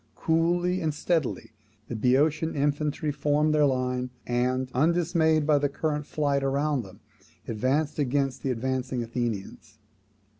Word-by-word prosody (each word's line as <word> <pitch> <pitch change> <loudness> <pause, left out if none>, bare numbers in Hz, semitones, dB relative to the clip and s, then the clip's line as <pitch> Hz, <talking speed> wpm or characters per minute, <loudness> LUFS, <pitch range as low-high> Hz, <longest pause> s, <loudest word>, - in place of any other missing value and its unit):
Coolly 175 +3 +1
and 155 -2 -1
steadily 160 -7 -1 0.4
the 120 - -5
Boeotian 145 +8 +2
infantry 150 +1 0
formed 150 +2 +1
their 150 -1 +4
line, 125 -1 -1 0.2
and, 125 +1 0
undismayed 160 +1 +2
by 150 -1 +4
the 145 0 +1
current 150 +1 -2
of - - -26
flight 140 -2 0
around 140 +1 +1
them, 95 -4 -13 0.5
advanced 135 +8 0
against 135 -1 0
the 135 - -2
advancing 130 0 -2
Athenians. 115 -3 -4
145 Hz, 135 wpm, -27 LUFS, 125-155 Hz, 0.5 s, their